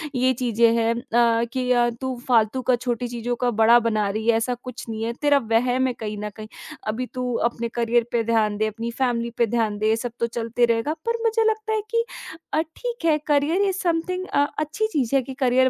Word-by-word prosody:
ये 255 +1 +3
चीज़ें 235 -2 +2
हैं 230 0 +2
अ, 235 -2 +2
कि 255 -1 -1
अ, 240 -1 +4
तू 260 -1 -2
फालतू 235 0 +3
का - - +5
छोटी 245 0 -2
चीज़ों 240 0 -3
का 245 - +2
बड़ा 230 +2 +7
बना 215 -3 0
रही 220 +3 -3
है, 230 -1 +5
ऐसा 235 +2 -1
कुछ 255 0 -7
नहीं 220 0 -4
है, 230 +1 -2
तेरा 290 -1 +4 0.2
वहम 250 +3 +2
है, 250 - -1
कहीं 215 -1 -4
न 210 - -3
कहीं, 215 0 -8 0.4
अभी 225 +4 -2
तू 250 -1 -2 0.2
अपने 235 0 -4
करियर 235 0 +1
पे 235 -1 +1
ध्यान 220 -2 +1
दे, 215 +1 +1
अपनी 225 +2 -4
फैमिली 235 -2 -1
पे 235 - +4
ध्यान 220 -2 0
दे, 215 +1 +1
ये 220 - +4
सब 240 +1 -4
तो 235 - +1
चलते 230 +1 0
रहेगा।" 230 +6 0
पर 465 0 -1
मुझे 450 0 +2
लगता 435 0 -2
है 435 - +1
कि 465 0 +2 0.5
अ, 310 - +3
ठीक 405 +6 -6
है, 315 -2 +4
करियर 295 +5 +2
इज 390 -2 +1
समथिंग 365 +1 -1
अ, 285 - +4 0.2
अच्छी 315 +9 -1
चीज़ 275 - -1
है 270 - +4
कि 265 +1 -8
करियर 260 0 +4
245 Hz, 230 wpm, -23 LUFS, 230-285 Hz, 0.5 s, बड़ा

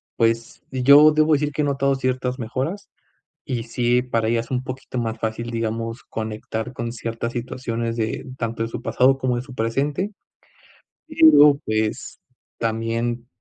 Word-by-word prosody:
pues 115 0 0
yo 140 +4 +7
debo 155 +1 +3
decir 150 0 +1
que 150 - -2
he - - +1
notado 140 -1 +1
ciertas 130 0 -2
mejoras, 135 - -4 0.6
y 120 -5 -3
sí, 120 +1 +1
para 115 -3 -1
ella 115 0 +2
es 115 - -9
un 125 0 -1
poquito 130 -1 -6
más 115 -1 -2
fácil, 115 +1 -3
digamos, 115 0 -3
conectar 110 +2 -5
con 115 -1 -4
ciertas 115 0 -4
situaciones 120 -1 -3
de 110 +3 -2
tanto 115 -1 -2
de 115 - -2
su 115 - -6
pasado, 135 +1 +3
como 125 -2 0
de 120 - -3
su 130 -1 -12
presente. 140 - -1 1.0
Pero, 150 - +7
pues 110 0 -2 0.4
también 115 +1 -2
120 Hz, 155 wpm, -22 LUFS, 115-135 Hz, 1.0 s, yo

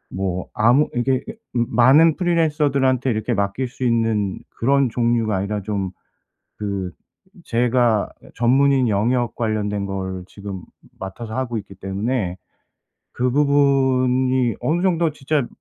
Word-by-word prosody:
뭐 95 -1 -2
아무 120 +7 +3
이게 130 +1 +1
이게 - - -9 0.2
많은 130 +7 +4
프리랜서들한테 150 -7 +1
이렇게 110 +1 -1
맡길 100 +5 -1
수 125 +1 -8
있는 115 -5 +1 0.2
그런 135 +1 +3
종류가 115 -3 +1
아니라 100 +2 -2
좀 100 -2 -3 0.7
그 100 -3 -3 0.5
제가 120 -2 +2 0.3
전문인 130 +2 +3
영역 120 +4 0
관련된 105 -3 -1
걸 95 -1 -4
지금 100 -2 -8 0.4
맡아서 110 +4 -7
하고 125 -3 -2
있기 100 -2 -8
때문에 95 0 -2 0.7
그 125 +1 0
부분이 130 -3 +2
어느 170 +3 0
정도 170 -4 +2
진짜 140 -2 -1
120 Hz, 260 characters per minute, -21 LUFS, 105-130 Hz, 0.7 s, 많은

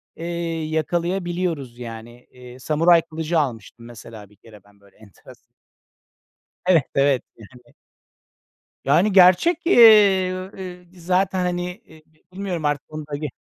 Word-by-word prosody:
eee, 170 -1 -4
yakalayabiliyoruz 170 -4 -3
yani. 120 +1 -10
Eee, 125 0 -14
Samuray 165 +5 +3
kılıcı 160 0 -3
almıştım 115 -3 -5
mesela 110 -3 -12
bir 105 - -23
kere 105 -2 -18
ben 100 0 -25
böyle 100 -1 -25
enteresan. 105 -3 -19 1.1
Evet, 165 -7 +4
evet. 140 -2 +2
Yani. 120 +2 -18 1.1
Yani 170 +10 +2
gerçek, 190 - +4
eee, 195 - +5
eee, 180 -1 -9
zaten, 185 +2 -1
hani, 180 0 -4
eee, 160 -8 -20 0.3
bilmiyorum 185 -4 -5
artık 145 -1 -1
onu 155 0 -7
da 145 - -5
ge 150 +1 -4
160 Hz, 125 wpm, -21 LUFS, 125-180 Hz, 1.1 s, eee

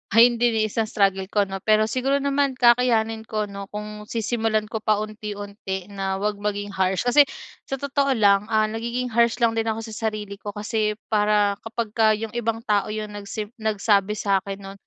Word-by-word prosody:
ayun 235 +1 +7
din 240 -1 +3
eh, - - +2
isang 220 +1 -1
struggle 195 -2 +2
ko, 205 -1 +2
'no? 195 0 -5
Pero 215 0 +4
siguro 260 +4 0
naman 280 0 +1
kakayanin 235 -3 +3
ko 215 -1 -3
'no? 200 0 -8
Kung 210 0 -6
sisimulan 220 -1 0
ko 220 -1 -5
paunti-unti 205 -3 -3
na 195 -1 -3
huwag 210 +1 0
maging 205 -1 -3
harsh. 190 0 +1
Kasi 290 +4 +7 0.4
sa 270 - -5
totoo 280 0 0
lang, 205 -5 +4
ah, 215 0 +3
nagiging 235 +3 -3
harsh 235 0 +2
lang 230 -2 +2
din 225 0 0
ako 220 - -4
sa 220 - -8
sarili 210 -2 -5
ko 205 0 -7
kasi 210 0 -2
para 210 -1 +2
kapag 225 0 -3
ka 225 - +4
'yong 220 +1 -3
ibang 230 -1 -1
tao 210 0 +1
'yong 215 -1 -5
nagsim 205 +1 -5
nagsabi 210 -3 +1
sa'kin 195 0 0
no'n. 195 0 -10
215 Hz, 185 wpm, -23 LUFS, 205-230 Hz, 0.4 s, ayun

